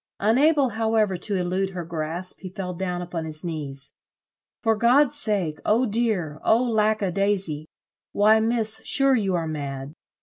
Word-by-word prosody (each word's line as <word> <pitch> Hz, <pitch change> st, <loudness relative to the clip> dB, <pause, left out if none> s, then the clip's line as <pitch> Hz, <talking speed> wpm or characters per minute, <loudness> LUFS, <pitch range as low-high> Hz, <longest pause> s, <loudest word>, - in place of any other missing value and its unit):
Unable 270 Hz, +6 st, +3 dB
however 220 Hz, -3 st, +1 dB
to 200 Hz, +3 st, -3 dB
elude 185 Hz, +1 st, -1 dB
her 175 Hz, -2 st, -4 dB
grasp 165 Hz, +2 st, -4 dB
he 185 Hz, -, -8 dB
fell 180 Hz, -1 st, -5 dB
down 180 Hz, 0 st, -3 dB
upon 175 Hz, -2 st, -5 dB
his 155 Hz, -1 st, -6 dB
knees. 140 Hz, -5 st, -3 dB, 0.7 s
"For 225 Hz, -2 st, +3 dB
God's 255 Hz, +6 st, +3 dB
sake! 200 Hz, -, -1 dB
Oh 230 Hz, +4 st, +2 dB
dear! 205 Hz, -9 st, -1 dB
Oh 230 Hz, +3 st, +3 dB
lack 215 Hz, -3 st, +1 dB
a 190 Hz, -, 0 dB
daisy! 190 Hz, -6 st, 0 dB, 0.4 s
Why, 215 Hz, +2 st, +4 dB
Miss, 225 Hz, -1 st, +1 dB
sure 275 Hz, 0 st, +3 dB
you 195 Hz, -6 st, 0 dB
are 165 Hz, -2 st, -1 dB
mad." 140 Hz, -2 st, -5 dB
195 Hz, 160 wpm, -24 LUFS, 170-220 Hz, 0.7 s, Why